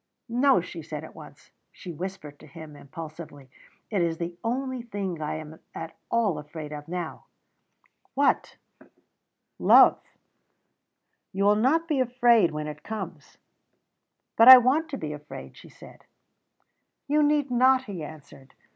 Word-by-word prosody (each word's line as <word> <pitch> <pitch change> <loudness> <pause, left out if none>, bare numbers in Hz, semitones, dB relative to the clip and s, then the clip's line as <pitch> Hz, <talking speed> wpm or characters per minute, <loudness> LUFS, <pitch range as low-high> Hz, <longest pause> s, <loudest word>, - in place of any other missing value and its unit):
"No," 245 -4 +3
she 170 -1 -9
said 155 -1 -7
at 160 - -11
once. 150 -2 -15 0.2
She 180 - -10
whispered 160 -4 -8
to - - -15
him 155 -1 -12
impulsively: 145 -2 -11 0.4
"It 200 -4 0
is 165 -1 -1
the 170 +1 -5
only 260 +2 -3
thing 200 -7 -5
I 150 - -3
am 155 0 -9 0.2
at 165 - -7
all 215 -9 0
afraid 150 0 -9
of 150 0 -9
now." 175 -1 -6 0.9
"What?" 280 +1 +1 1.0
"Love." - - +6 1.3
"You 195 +1 -2
will 205 +1 +4
not 290 +10 +1
be 300 -5 0
afraid 240 -3 +3
of - - +1
it - - -12
when 150 0 -4
it 150 0 -8
comes." 185 -8 -8 1.0
"But 230 - +6
I 260 0 +13
want 270 +6 +1
to 275 - -5
be 150 -7 -5
afraid," 150 0 -10
she - - -15
said. - - -16 1.0
"You 300 +2 +2
need 290 -2 +1
not," 255 +1 +4
he 195 -9 -7
answered. 145 -3 -13
180 Hz, 150 wpm, -26 LUFS, 155-245 Hz, 1.3 s, I